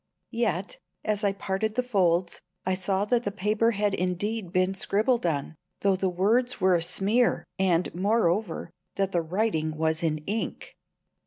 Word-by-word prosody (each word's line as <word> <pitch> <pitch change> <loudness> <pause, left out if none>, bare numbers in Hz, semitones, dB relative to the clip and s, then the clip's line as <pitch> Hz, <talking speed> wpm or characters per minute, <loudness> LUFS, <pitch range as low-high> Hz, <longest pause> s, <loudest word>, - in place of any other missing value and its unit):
Yet, 240 - -1 0.3
as 210 -1 0
I 200 - +3
parted 195 +2 -2
the 250 - +1
folds, 180 -7 +1 0.2
I 185 - +1
saw 190 +2 0
that 235 +2 +2
the 200 - -2
paper 210 +3 +1
had 205 -2 0
indeed 185 +2 -2
been 185 +1 +2
scribbled 215 +3 +1
on, 145 -2 -2 0.3
though 195 -1 +3
the 190 0 0
words 225 +8 +1
were 190 -1 +4
a 170 - +3
smear; 210 +8 +2
and, 180 -2 +2
moreover, 190 -2 0 0.2
that 195 -1 0
the 175 - +1
writing 160 -3 -1
was 160 0 0
in 160 -2 0
ink! 215 +3 -4
195 Hz, 160 wpm, -27 LUFS, 175-220 Hz, 0.3 s, were